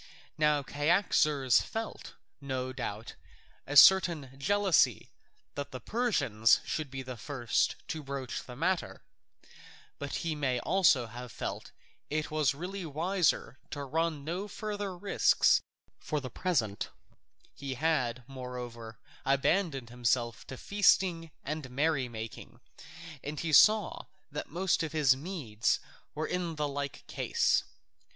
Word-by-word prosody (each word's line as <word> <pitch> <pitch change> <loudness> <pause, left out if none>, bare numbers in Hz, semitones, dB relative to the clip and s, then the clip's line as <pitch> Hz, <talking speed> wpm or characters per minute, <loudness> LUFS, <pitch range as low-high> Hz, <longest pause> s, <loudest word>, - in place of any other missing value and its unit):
Now 150 -2 +2
Cyaxares 145 - +3
felt, 225 0 -6 0.3
no 130 -2 -3
doubt, 115 -4 -5 0.5
a 145 +1 +1
certain 170 -7 +7
jealousy 195 +4 +2 0.4
that 140 0 -5
the 130 - -7
Persians 120 - +2
should 155 -3 -3
be 135 0 -6
the 130 -1 -7
first 120 0 0
to 160 - -3
broach 135 -2 -5
the 125 - -10
matter, 165 - -1 1.0
but 145 0 -4
he 165 - 0
may 135 -4 0
also 175 -10 +4
have 120 +1 -9
felt - - -5 0.4
that 150 - -3
it 155 - -3
was 150 -3 +2
really 185 +5 -5
wiser 165 -2 0
to 145 - -5
run 155 +1 -1
no 175 +7 -3
further 205 -3 -4
risks 200 +2 +3 0.4
for 150 - -2
the 130 -3 -7
present; 120 - -1 0.6
he 135 -2 -5
had, 130 -5 0
moreover, 125 -3 -7 0.3
abandoned 135 - +1
himself 120 -1 -1
to 130 - -7
feasting 185 -5 +2
and 150 -2 -4
merrymaking, 125 -6 -2 0.6
and 145 +1 -4
he 165 -2 -2
saw 210 +7 +5 0.2
that 150 - -5
most 180 +4 +1
of 160 -1 -3
his 145 -5 +4
Medes 135 - -1 0.4
were 155 +1 -2
in 175 -2 -2
like 145 -2 -3
case. - - +1
145 Hz, 125 wpm, -31 LUFS, 130-170 Hz, 1.0 s, certain